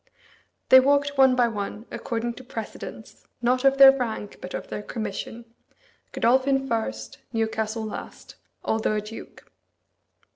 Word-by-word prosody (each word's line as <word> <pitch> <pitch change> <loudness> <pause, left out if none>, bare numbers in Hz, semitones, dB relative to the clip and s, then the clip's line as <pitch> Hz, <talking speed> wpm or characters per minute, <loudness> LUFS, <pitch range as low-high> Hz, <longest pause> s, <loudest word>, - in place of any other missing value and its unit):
They 260 - +10
walked 285 +2 +2
one 265 -2 +5
by 245 -1 +3
one, 210 0 -5
according 235 0 -3
to 255 - -12
precedence, 225 -3 -9
not 250 +1 +1
of 270 0 +4
their 270 -1 +10
rank, 225 -5 -4
but 180 - -6
of - - -6
their - - -4
commission 220 +2 -6 0.7
Godolphin 265 +3 +2
first, 110 - -3
Newcastle 220 -1 -2
last, 215 - -8 0.3
although 220 -1 0
a 210 - 0
duke. 215 +2 -11
235 Hz, 135 wpm, -25 LUFS, 220-260 Hz, 0.7 s, They